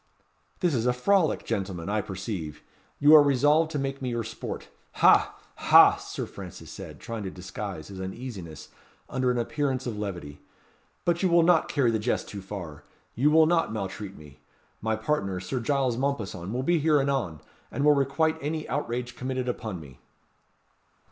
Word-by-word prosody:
"This 175 -4 +2
is 120 -2 0
a 125 - +3
frolic, 165 +6 +2
gentleman, 95 -6 -3
I 105 +1 0
perceive. 95 -6 -6 0.3
You 145 +2 +6
are 155 - +11
resolved 145 +3 +3
to 155 - -3
make 135 0 -3
me 130 - -2
your 120 -1 -2
sport 110 - -6 0.3
ha! - - +5 0.2
ha!" - - +7
Sir - - -5
Francis - - -10
said, - - -9
trying 115 -2 -5
to 95 - -4
disguise 95 -2 -7
his 95 -1 -7
uneasiness 95 - -7 0.4
under 130 -1 0
an 125 - +1
appearance 130 +1 -1
of 110 -4 -4
levity 85 -8 -5 0.7
"But 170 0 +1
you 190 - +3
will 170 0 +5
not 170 -1 +4
carry 130 -6 +2
the 110 - 0
jest 115 +4 -1
too 100 - -7
far. 90 -6 -8 0.3
You 140 +6 +3
will 160 +1 +6
not 165 -5 +2
maltreat 100 -1 -5
me. 75 -1 -14 0.4
My 110 0 0
partner, 110 -5 -1
Sir 95 +8 -3
Giles 130 -1 0
Mompesson, 110 -9 -2
will 125 +3 -2
be 170 +3 +2
here 155 -1 +3
anon, 135 - -1 0.3
and 140 - -1
will 150 - +7
requite 140 +3 +1
any 155 +2 -3
outrage 125 -3 -3
committed 130 0 -3
upon 110 -6 -3
me." 70 -5 -13
120 Hz, 175 wpm, -27 LUFS, 100-145 Hz, 0.7 s, are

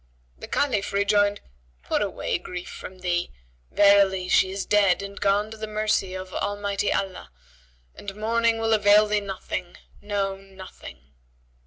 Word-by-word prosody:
The - - -8
Caliph 210 -7 0
rejoined, 205 0 +2 0.4
"Put - - 0
away - - -2
grief 180 0 -7
from 185 0 -10
thee: 175 -1 -1 0.4
verily 200 -2 +4
she 190 - +4
is 195 +1 -4
dead 200 -2 +3
and 200 0 -8
gone 205 +2 +2
to 220 - -8
the 220 0 -5
mercy 215 -3 0
of 185 0 -7
Almighty 205 0 -1
Allah 195 -2 -3 0.6
and 195 -1 -8
mourning 230 +1 +1
will 225 0 +1
avail 210 0 +6
thee 210 0 0
nothing; 185 -2 -5 0.2
no, 200 -2 -2
nothing." 190 - -13
200 Hz, 145 wpm, -25 LUFS, 190-210 Hz, 0.6 s, avail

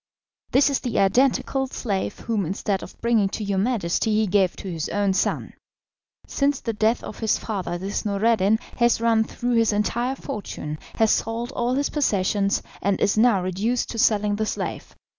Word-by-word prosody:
This 275 +2 +4
is 275 - +1
the 245 - -3
identical 265 +5 +2
slave, 205 -6 -3
whom 220 -4 -1
instead 195 +3 -2
of - - -11
bringing 230 -4 +2
to 215 - -4
your 200 -2 0
Majesty 215 -1 0
he 215 0 +3
gave 190 -2 +2
to - - -8
his 165 -3 -3
own 205 -1 +1
son. - - -1 0.7
Since 280 -1 0
the 230 - -2
death 220 +2 +1
of - - -8
his 220 -2 +1
father 185 -5 -3
this 195 +3 -3
Noureddin 210 0 +2 0.2
has 235 -1 +3
run 225 -1 +3
through 240 +1 -2
his 230 -1 +3
entire 235 +5 0
fortune, 155 - -6 0.2
has 220 -1 +3
sold 230 +3 -1
all 245 -1 -1
his 280 +1 0
possessions, 200 -7 +1 0.2
and 195 +1 +1
is 200 - +2
now 215 -4 +4
reduced 205 +7 -1
to 230 - -5
selling 210 -1 +2
the 220 - 0
slave. - - -4
215 Hz, 180 wpm, -24 LUFS, 195-235 Hz, 0.7 s, This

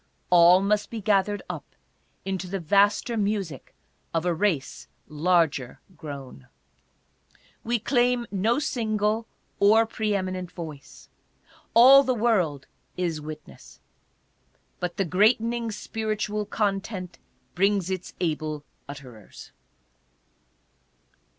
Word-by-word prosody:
All 175 +1 +7
must 205 +1 0
be 230 - -5
gathered 205 -1 +1
up 155 - -8 0.5
into 190 -1 -3
the 195 +2 -3
vaster 205 +7 +2
music 200 - -3 0.4
of 165 +1 0
a 175 - +2
race 165 -6 -1 0.2
larger 155 -4 +1 0.2
grown. 140 - -9 1.2
We 240 +1 0
claim 245 +1 +1
no 210 +5 +1
single 220 -5 -1 0.3
or 220 +3 +5
pre 215 -2 -2
eminent 185 -2 -3
voice. 155 -5 -10 0.7
All 260 +4 +9
the 260 -2 0
world 185 - +1 0.3
is 170 -4 -2
witness. 155 0 -11 1.0
But 180 -1 -4
the 195 - +1
greatening 225 +5 +2
spiritual 210 0 -3
content 195 -3 -3 0.3
brings 195 0 +1
its 185 -1 -5
able 155 -3 -2 0.3
utterers. 130 -7 -11
195 Hz, 100 wpm, -25 LUFS, 165-215 Hz, 1.2 s, All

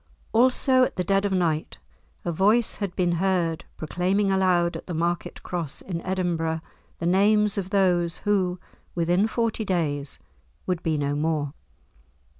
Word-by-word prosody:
Also 255 +2 +4
at - - -1
the 180 - -1
dead 195 +2 +1
of 200 - 0
night 165 -4 0 0.5
a 175 - 0
voice 210 +7 +2
had 200 -4 -4
been 180 -1 +1
heard 175 -4 0
proclaiming 185 +5 0
aloud 180 -2 +2
at - - -12
the 175 - -4
market 170 +2 -2
Cross 170 -5 -4
in 170 -3 -4
Edinburgh 170 -4 -1 0.4
the 170 - -4
names 205 +3 +3
of 195 -3 -3
those 180 -4 +2
who, 185 -3 +1 0.4
within 175 +4 +2
forty 230 -1 -1
days, 150 - -1 0.5
would 180 -2 -1
be 160 -3 0
no 145 0 -1
more. 150 -2 -1
180 Hz, 150 wpm, -25 LUFS, 165-195 Hz, 0.5 s, Also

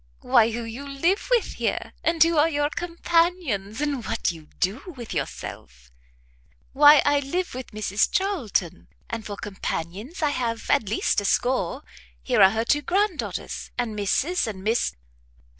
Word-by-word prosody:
"Why, 240 -3 +4
who 235 +1 -4
you 235 +5 -7
live 335 +9 0
with - - +3
here, - - -2
and 330 -1 +4
who 335 0 +2
are 315 +2 +4
your 290 -1 0
companions, 335 - 0
and 285 -5 -1
what - - -1
you 160 -3 -12
do 255 - -2
with 235 -2 -7
yourself." 60 0 -6 0.8
"Why, 290 +1 +8
I 290 0 +4
live 350 +7 -3
with 255 -1 -7
Mrs 210 -1 0
Charlton; 280 - -1 0.2
and 230 -1 -4
for 205 -1 -6
companions, 205 - -5
I 295 - +3
have 230 -4 -3
at 210 - +2
least 210 - +1
a - - -6
score; 245 -4 0 0.4
here - - +2
are 190 - +9
her 220 +3 -1
two 290 +4 +2
grand 395 +8 +1
daughters, - - -5
and 240 -3 -2
Mrs 260 - 0
and 190 -3 -6
Miss 220 - 0
250 Hz, 160 wpm, -24 LUFS, 210-320 Hz, 0.8 s, are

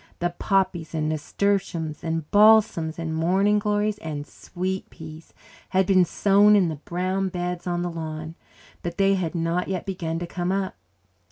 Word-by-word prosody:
The 175 0 -1
poppies 185 -3 -1
and 155 -1 0
nasturtiums 165 0 -1
and 165 -2 -2
balsams 205 -7 +5
and 165 -1 -3
morning 190 +6 +2
glories 210 0 0
and 150 -5 -5
sweet 185 +4 -5
peas 160 0 -11 0.4
had 190 0 +2
been 185 -2 +4
sown 205 +4 +4
in 190 -4 +3
the 155 - -5
brown 185 +5 -2
beds 180 0 -4
on 175 0 -1
the 175 - -3
lawn, 160 -1 -6 0.5
but 170 0 -5
they 195 0 +4
had 180 -3 -2
not 170 +2 -1
yet 185 -2 -3
begun 170 -4 -3
to 175 - -3
come 175 +1 -3
up. 195 -1 -1
175 Hz, 165 wpm, -24 LUFS, 165-195 Hz, 0.5 s, balsams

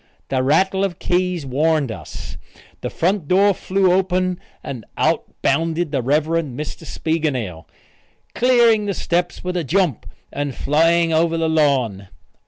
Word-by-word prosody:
The 130 -1 +1
rattle 190 +8 +2
of 185 -4 -2
keys 180 -3 -1
warned 145 0 +1
us. - - -8 0.5
The - - -3
front 180 -2 0
door 200 +4 +4
flew 190 0 +1
open 185 -1 0 0.2
and 125 -5 -6
out - - +1 0.2
bounded 165 +2 +1
the 135 -3 0
Rev. 145 +5 +2
Mr. 155 -1 -3
Spiegelnail, 130 - -2 0.7
clearing 235 -4 +4
the 200 - -1
steps 175 +1 -1
with 180 0 -3
a 175 - 0
jump, 165 - 0 0.3
and 145 -2 -3
flying 165 +3 +2
over 165 +1 +2
the 165 0 0
lawn. 135 -11 +1
165 Hz, 140 wpm, -20 LUFS, 140-180 Hz, 0.7 s, door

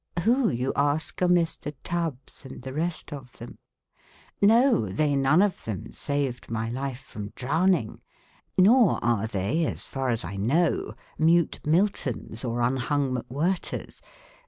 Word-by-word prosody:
Who, 245 +2 +3
you 125 +2 -1
ask, 145 +5 0
are 180 - +4
Mr. 165 -4 +1
Tubbs 165 -8 -4
and 130 -2 -10
the 130 0 -6
rest 165 +1 -3
of 130 -4 -9
them? 120 +1 -11 0.8
No, 230 - +5
they 145 +10 +1
none 140 +7 +4
of 205 -3 -1
them 105 -6 -5
saved 140 -4 -3
my 115 0 -2
life 130 0 -4
from 105 -6 -8
drowning, 160 - +1 0.6
nor 215 +2 +5
are 115 -2 +1
they 110 - 0
(as - - -3
far 135 -1 -3
as 115 -2 0
I 100 - -6
know) 145 - +1 0.2
mute 165 +1 +3
Miltons 150 - 0
or 120 -1 -1
un 125 +2 +1
hung 135 +1 0
McWhirters. 140 +10 -3
140 Hz, 145 wpm, -26 LUFS, 120-170 Hz, 0.8 s, No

